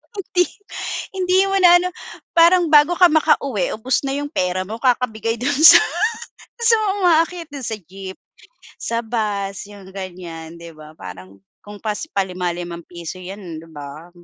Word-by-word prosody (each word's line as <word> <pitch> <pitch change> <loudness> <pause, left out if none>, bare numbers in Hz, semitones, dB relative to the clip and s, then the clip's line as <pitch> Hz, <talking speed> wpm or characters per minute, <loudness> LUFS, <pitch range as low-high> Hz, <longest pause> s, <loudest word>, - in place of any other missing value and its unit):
Hindi 360 -2 0 0.7
hindi 370 0 +1
mo 390 - +2
na 350 -2 +7
ano, 360 +1 -2 0.5
parang 340 +1 +5
bago 300 +3 +6
ka 360 - +7
maka-uwi 280 - +1
ubos 250 +6 0
na 270 - -1
yung 290 0 -4
pera 185 - -1
mo 220 +2 -6
kakabigay 230 -3 0
dun 255 +4 0
sa 310 +4 +9 0.8
sa 460 0 +6
mga 425 -2 0
umaakyat 335 -1 +2
dun 275 -3 -6
sa 220 - -2
jeep, 190 +1 -10 0.6
sa 230 0 -2
bus, 205 -4 -3
yung 200 -2 -13
ganyan, 175 -4 -8
di 170 0 -10
ba? 155 0 -13
Parang 95 +1 -11 0.2
kung 205 0 -11
pas 215 -1 -3 0.2
palima-limang 175 -3 -3
piso 170 0 -8
yan, 185 -2 -8
di 165 - -15
ba? 150 +2 -10
210 Hz, 155 wpm, -20 LUFS, -, 0.8 s, sa